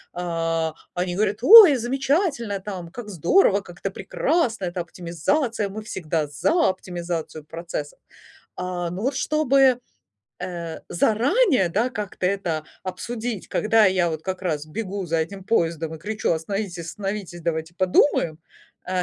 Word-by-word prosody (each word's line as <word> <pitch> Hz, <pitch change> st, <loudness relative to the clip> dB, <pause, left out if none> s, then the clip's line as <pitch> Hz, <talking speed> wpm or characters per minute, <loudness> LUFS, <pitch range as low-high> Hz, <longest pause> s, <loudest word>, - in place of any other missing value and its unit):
э, 165 Hz, -2 st, -1 dB, 0.2 s
они 180 Hz, 0 st, -2 dB
говорят: 205 Hz, +1 st, 0 dB
"Ой, 395 Hz, -, +11 dB
замечательно!" 265 Hz, -, 0 dB
Там, 185 Hz, -3 st, -7 dB
"Как 230 Hz, +1 st, -8 dB
здорово!". 200 Hz, -, +3 dB
"Как 175 Hz, -2 st, -14 dB
это 195 Hz, -, -3 dB
прекрасно!". 230 Hz, -, -1 dB
"Это 175 Hz, +1 st, -4 dB
оптимизация!". 195 Hz, -, -1 dB
"Мы 210 Hz, +3 st, -6 dB
всегда 160 Hz, -6 st, -2 dB
за 305 Hz, -, +2 dB
оптимизацию 175 Hz, -4 st, -5 dB
процесса!" 165 Hz, -2 st, -6 dB, 0.6 s
А, 180 Hz, -1 st, -3 dB
но 180 Hz, +4 st, -5 dB
вот 265 Hz, +2 st, 0 dB
чтобы, 270 Hz, -4 st, +3 dB, 0.6 s
э, 170 Hz, -3 st, -5 dB
заранее, 250 Hz, -, +3 dB
да, 220 Hz, +9 st, 0 dB
как-то 205 Hz, -4 st, -3 dB
это 175 Hz, -5 st, -1 dB, 0.2 s
обсудить, 220 Hz, +3 st, -5 dB
когда 220 Hz, 0 st, +3 dB
я 185 Hz, -3 st, +3 dB
вот 160 Hz, -1 st, -5 dB
как 190 Hz, +1 st, -4 dB
раз 155 Hz, -5 st, -2 dB
бегу 195 Hz, +3 st, -4 dB
за 165 Hz, 0 st, 0 dB
этим 190 Hz, +4 st, -4 dB
поездом 165 Hz, -6 st, 0 dB
и -, -, -9 dB
кричу: 210 Hz, +4 st, -1 dB
"Остановитесь, 180 Hz, +3 st, -3 dB
остановитесь, 195 Hz, -2 st, -5 dB
давайте 160 Hz, 0 st, -2 dB
подумаем!" 180 Hz, -, +2 dB, 0.5 s
Э. 185 Hz, 0 st, 0 dB
190 Hz, 140 wpm, -23 LUFS, 170-225 Hz, 0.6 s, Ой